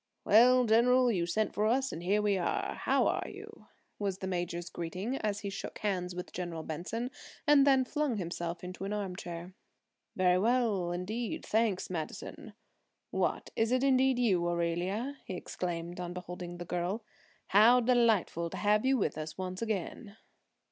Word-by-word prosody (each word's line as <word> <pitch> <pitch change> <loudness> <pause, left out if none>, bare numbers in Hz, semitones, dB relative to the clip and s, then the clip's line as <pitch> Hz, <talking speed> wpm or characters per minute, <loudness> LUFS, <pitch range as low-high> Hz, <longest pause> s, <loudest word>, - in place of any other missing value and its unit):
"Well, 250 +3 +6
General, 245 +3 +4
you 175 -5 0
sent 215 +5 0
for 210 +1 +1
us 265 +4 +1
and 165 - -6
here 200 +4 +1
we 205 -1 +2
are. 180 -2 -1
How - - +1
are - - 0
you?" - - -12 0.3
was 200 -3 -1
the 190 - -5
major's 175 -1 -3
greeting 185 +11 -4
as 205 -3 -2
he 200 -2 -4
shook 195 - -6
hands 180 -4 -2
with 180 +1 -6
General 175 -3 -4
Benson 205 - -4 0.3
and 290 -2 +6
then 265 -2 +5
flung 295 -3 -1
himself 170 -1 -4
into 180 +1 -7
an 200 - -3
arm 200 -3 -3
chair. 175 0 -7 0.6
"Very 180 -1 +3
well, 220 -5 +1
indeed, 215 +6 -3
thanks, 220 -4 +1
Madison. 160 -4 -6 0.6
What, - - -1
is 225 +1 +1
it 255 +1 +2
indeed 265 -1 +4
you, 200 -8 +2
Aurelia?" 175 +10 -1
he 185 - -6
exclaimed 175 -1 -4
on 175 0 -4
beholding 180 -1 -7
the 175 - -6
girl. 180 +6 -2 0.5
"How 225 +5 +7
delightful 225 -9 +2
to - - -6
have 210 0 +2
you 265 0 +3
with 155 - -1
us 155 0 -6
once 185 +1 -4
again!" 215 0 -4
195 Hz, 170 wpm, -31 LUFS, 175-235 Hz, 0.6 s, How